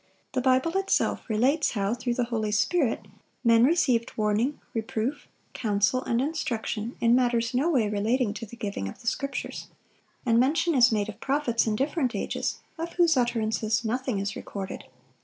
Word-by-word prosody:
The 260 - 0
Bible 260 +7 +2
itself 390 -8 0
relates 255 +8 +2
how, 200 -1 0
through 245 0 -2
the 245 - +1
Holy 215 -2 0
Spirit, 245 +2 +1 0.4
men 230 -1 +5
received 255 -7 +2
warning, 215 +6 +1
reproof, 225 +4 -3 0.3
counsel, 210 +3 +1
and 235 - +1
instruction, 240 -6 -2
in 235 0 +4
matters 240 -2 +2
in 250 - +2
no 310 +5 +2
way 250 -10 +2
relating 210 +2 0
to 225 +1 -7
the 235 - -11
giving 200 - -4
of - - -11
the - - -17
Scriptures. 275 +4 -3 0.6
And 230 -1 +4
mention 325 +7 +2
is 250 -3 +5
made 210 -2 0
of 210 0 -9
prophets 265 -4 0
in 215 - +1
different 270 0 0
ages, - - -2 0.2
of 335 +1 -4
whose 340 -3 +4
utterances 225 -2 0
nothing 250 0 -1
is 200 +1 -2
recorded. 195 -1 -6
235 Hz, 170 wpm, -27 LUFS, 220-265 Hz, 0.6 s, men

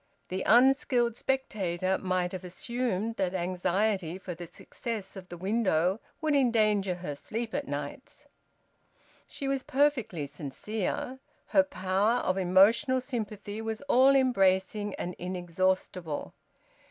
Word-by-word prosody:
The 185 +1 -2
unskilled 245 -1 +4
spectator 190 -9 -1
might 185 -1 0
have 185 0 -6
assumed 225 +3 -2
that 190 -1 0
anxiety 185 0 0
for 185 -1 -6
the 170 0 -8
success 215 +4 -6
of 185 -2 -10
the 175 - -7
window 190 -1 +1 0.2
would 310 -2 +2
endanger 215 -7 +3
her 175 -4 -5
sleep 225 +9 -5
at 285 0 -2
nights. - - -6 1.0
She 275 - -5
was 270 -1 0
perfectly 260 - +1
sincere. 185 - -4 0.3
Her 290 - +6
power 205 -3 +1
of 185 - 0
emotional 210 +9 +4
sympathy 215 -5 -5
was 225 -1 -4
all 275 -1 +5
embracing 205 -5 +2
and 180 - -4
inexhaustible. 180 -2 -2
200 Hz, 120 wpm, -29 LUFS, 185-240 Hz, 1.0 s, Her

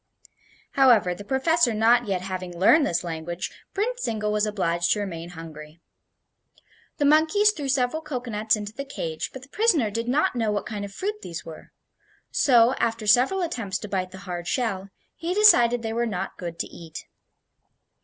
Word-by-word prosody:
However, 235 -10 +4
the 205 - -9
professor 265 +1 +2
not 235 +2 +3
yet 185 -2 -1
having 185 -2 -5
learned 280 - +5
his 170 - -1
language, 170 +1 -5 0.2
Prince 485 +5 -2
Zingle 215 - -2
was 210 0 +1
obliged 175 -4 0
to 210 - -3
remain 170 -4 -5
hungry. 160 -2 -11 1.2
The 290 - +1
monkeys 320 +8 +4
threw 290 -8 -5
several 260 +3 +1
cocoanuts 240 -8 -1
into 210 0 -6
the 275 - -5
cage, 165 - -5
but 260 - -10
the 275 - -15
prisoner 330 - +2
did 230 +3 -3
not 270 +2 +1
know 225 -3 0
what 205 - -2
kind 210 -3 -5
of 200 - -7
fruit 415 - -4
these 170 -1 -7
were; 160 -1 -11 0.6
so, 245 -2 +4
after 225 -1 -1
several 255 - +3
attempts 230 - -3
to 210 - -8
bite 185 -2 -2
the 190 - -11
hard 175 -2 -5
shell, 200 -6 -2 0.3
he 345 +2 -3
decided 245 - +5
they 225 0 -3
were 235 +1 0
not 200 -5 -4
good 170 -2 -7
to - - -3
eat. 160 -2 -10
220 Hz, 175 wpm, -25 LUFS, 185-270 Hz, 1.2 s, learned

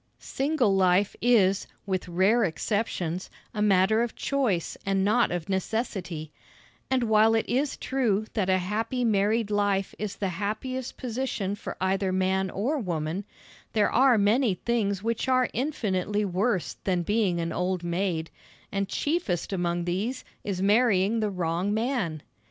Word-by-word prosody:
Single 270 -7 0
life 190 +1 +3
is, 205 -5 +3 0.2
with 190 -2 -2
rare 190 +7 +3
exceptions, 185 -1 -2 0.2
a 210 - -2
matter 210 +2 +4
of 235 -1 -2
choice 245 - 0
and 195 0 +1
not 235 +4 +3
of 175 -2 -3
necessity; 190 -5 -3 0.6
and 260 -2 +2
while 220 0 +4
it 225 - 0
is 275 +3 0
true 225 -6 0
that 195 -4 0
a 185 - +4
happy 220 +7 -1
married 210 +1 +2
life 205 -2 +1
is 210 -2 -3
the 195 - -2
happiest 215 +8 -4
position 235 -5 -2
for 205 - -6
either 190 0 0
man 190 0 +1
or 255 - -1
woman, 175 -2 -3 0.5
there 210 -2 +2
are 255 -1 +5
many 210 +1 +3
things 200 -2 -1
which 230 +2 -1
are 255 -1 +3
infinitely 210 -7 -1
worse 190 +1 -1
than 180 -3 0
being 205 -3 +1
an 165 0 -2
old 180 0 -1
maid, 170 -2 -1 0.4
and 195 0 -1
chiefest 290 - -1
among 175 -1 -1
these 200 +9 -2 0.2
is 190 -2 -2
marrying 210 0 +3
the 215 -1 0
wrong 180 +2 -1
man! 220 - -1
200 Hz, 145 wpm, -27 LUFS, 185-230 Hz, 0.6 s, are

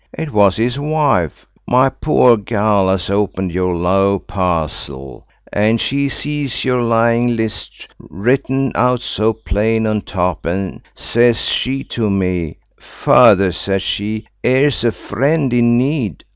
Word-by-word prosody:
It 160 -2 -4
was 100 -3 +3
his 120 +4 -1
wife–my 135 - 0
pore 130 -5 +3
gell–as 100 -4 0
opened 95 -2 -1
your 90 0 -1
low 95 +3 +1
parcel, 80 -9 -4 0.3
and 110 +3 +2
she 140 +3 -1
sees 145 -2 -3
your 125 -1 +1
lying 115 +1 +2
list 110 -2 -5
written 130 +6 -1
out 125 0 +1
so 110 -3 0
plain 110 +1 -1
on 110 -1 0
top, 90 -4 -2
and, 95 +3 -3
sez 120 0 +2
she 135 +2 -1
to 110 -3 -2
me, 90 -5 -1 0.2
'Father,' 95 -1 +4
says 95 +3 -2
she, 110 +2 -3 0.2
'ere's 130 0 +2
a 120 - +2
friend 135 - -1
in 120 0 +3
need! 130 - -1
110 Hz, 130 wpm, -16 LUFS, 95-125 Hz, 0.3 s, Father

